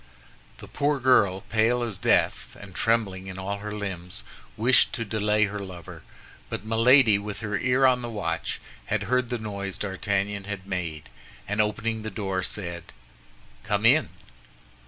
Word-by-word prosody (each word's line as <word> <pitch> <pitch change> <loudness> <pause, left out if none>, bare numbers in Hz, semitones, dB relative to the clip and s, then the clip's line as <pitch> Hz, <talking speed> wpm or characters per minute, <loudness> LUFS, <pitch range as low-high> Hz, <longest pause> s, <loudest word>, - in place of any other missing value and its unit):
The - - -11
poor 145 0 0
girl, 100 -7 +4
pale 115 +2 +1
as 110 -5 -3
death - - +1
and 100 -2 -11
trembling 95 -3 0
in 95 -1 -7
all 100 +2 -3
her 105 +1 -6
limbs, 95 -4 -5 0.3
wished 120 +4 +4
to 115 - -3
delay 105 0 +2
her 105 0 -4
lover; 90 -4 -9 0.5
but - - -5
Milady, 115 -1 +5
with 105 +1 -6
her 105 -1 -2
ear 130 +1 +3
on 125 -1 +4
the 120 - -4
watch, 90 -7 -3 0.3
had 105 -1 0
heard 125 +3 +1
the 120 - -1
noise 100 -3 -5
D'Artagnan 100 0 -2
had 100 -2 -5
made, 85 -5 -4 0.4
and 105 +1 +2
opening 110 +1 -1
the 110 - -4
door, 95 -2 -2
said, 85 -3 -4 0.8
"Come - - 0
in." - - +5
105 Hz, 155 wpm, -26 LUFS, 95-115 Hz, 0.8 s, Milady